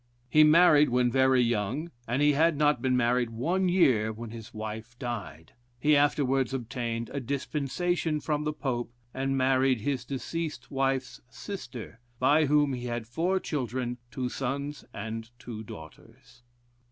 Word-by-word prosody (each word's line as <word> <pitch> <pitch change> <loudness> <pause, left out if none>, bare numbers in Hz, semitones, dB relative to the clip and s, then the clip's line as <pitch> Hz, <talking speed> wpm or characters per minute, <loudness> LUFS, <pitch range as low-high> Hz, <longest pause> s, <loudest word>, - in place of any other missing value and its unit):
He 155 +3 +7
married 155 -2 +6
when 125 0 +2
very 130 0 +4
young, 120 +8 -1 0.2
and 125 +5 +1
he 150 - +6
had 160 +2 +3
not 150 0 +3
been 130 -1 +2
married 120 0 +2
one 175 +12 0
year 125 - +3
when 110 +1 -8
his 115 0 -9
wife 110 +1 -7
died. 100 - -6 0.3
He 150 +3 +4
afterwards 135 -2 +2
obtained 115 -2 -4
a 140 - -1
dispensation 150 +5 -1
from 150 -1 -1
the 150 - 0
Pope, 125 -5 -3 0.2
and 135 0 -1
married 130 -2 +3
his 130 +1 -1
deceased 145 +1 -5
wife's 135 -1 -1
sister, 125 - -8 0.2
by 145 +5 +4
whom 145 -1 +3
he 125 -1 -4
had 120 -2 -3
four 170 +11 0
children, 125 - -3
two 130 0 -3
sons 140 +3 -4
and 110 +2 -6
two 115 -3 -7
daughters. 80 +5 -13
130 Hz, 150 wpm, -28 LUFS, 120-150 Hz, 0.3 s, He